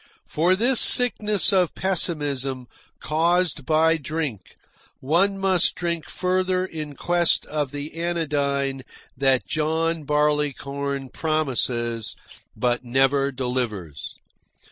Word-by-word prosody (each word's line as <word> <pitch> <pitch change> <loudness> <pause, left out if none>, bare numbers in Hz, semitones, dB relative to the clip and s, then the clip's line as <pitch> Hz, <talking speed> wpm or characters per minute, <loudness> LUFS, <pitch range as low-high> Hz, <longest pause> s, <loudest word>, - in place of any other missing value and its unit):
For 175 +4 +1
this 240 +5 +3
sickness 215 -5 +6
of 180 -3 +1
pessimism, 145 -8 -1 0.3
caused 170 -1 0
by 160 +1 +3
drink, 145 - -5 0.4
one 180 +8 +1
must 190 -2 +1
drink 170 -2 -4
further 185 0 -1
in 155 -5 -7
quest 175 +3 +1
of 150 -2 -3
the 145 +1 -7
anodyne 145 -5 -2 0.3
that 135 -1 +1
John 160 +1 -1
Barleycorn 140 -2 -1
promises 125 -7 -2 0.4
but 120 0 0
never 135 +3 +1
delivers. 125 - -4
150 Hz, 100 wpm, -23 LUFS, 135-170 Hz, 0.4 s, sickness